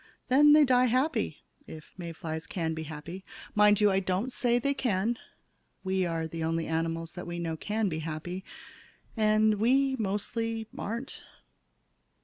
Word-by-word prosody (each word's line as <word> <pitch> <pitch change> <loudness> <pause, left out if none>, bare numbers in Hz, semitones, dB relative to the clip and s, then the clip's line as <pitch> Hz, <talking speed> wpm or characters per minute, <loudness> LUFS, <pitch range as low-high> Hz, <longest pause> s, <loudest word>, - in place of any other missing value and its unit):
Then 295 +3 +7
they 300 -1 +7
die 250 -1 +4
happy 260 +6 0 0.2
if 155 -1 -11
May 170 -2 -6
flies 160 0 -5
can 165 -4 -2
be 160 0 -5
happy. 165 +5 -7 0.3
Mind 210 -1 +5
you, 210 -1 +5
I 190 - +3
don't 195 +7 -2
say 240 -1 +2
they 280 +3 +1
can. 230 -2 0 0.6
We 190 -1 0
are 165 -1 -2
the 165 0 -5
only 165 0 0
animals 165 0 -2
that 180 - -7
we 175 0 -4
know 165 -2 -2
can 210 +6 -1
be 160 -4 -2
happy. 165 +4 -5 0.7
And 215 -1 +3
we 265 +4 +3
mostly 225 +2 -2
aren't. 235 +6 -5
195 Hz, 155 wpm, -29 LUFS, 165-230 Hz, 0.7 s, Then